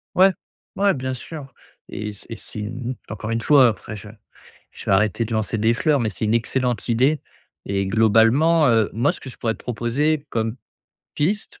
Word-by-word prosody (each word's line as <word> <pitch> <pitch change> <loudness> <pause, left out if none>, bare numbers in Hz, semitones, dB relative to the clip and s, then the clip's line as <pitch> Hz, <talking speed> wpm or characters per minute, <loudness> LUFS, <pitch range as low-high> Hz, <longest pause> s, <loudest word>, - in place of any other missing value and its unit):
Ouais, 190 +1 +6 0.4
ouais, 200 0 +3
bien 130 0 -3
sûr. 135 +2 -9 0.3
Et 105 0 -5
c'est 110 +3 -10
c'est 110 - -9
n 120 +4 -4
encore 110 0 -5
une 115 0 0
fois, 135 -1 +6
après, 110 0 -6
je 105 0 -10 0.6
je - - -11
vais - - 0
arrêter 105 +3 +2
de 115 - -5
lancer 110 0 -1
des 115 +2 +3
fleurs 145 +3 +2
mais 115 - 0
c'est 105 - -3
une 110 - +1
excellente 120 0 0
idée. 130 +6 +3 0.5
Et 100 0 -1
globalement, 115 +10 +4
heu, 115 -3 +3
moi, 120 +8 +2
ce - - -9
que 135 - -9
je 125 - -11
pourrais 115 -1 -1
te - - -15
proposer 140 +6 0
comme 115 0 -1 0.6
piste 195 +8 -1
115 Hz, 190 wpm, -22 LUFS, 110-140 Hz, 0.6 s, Ouais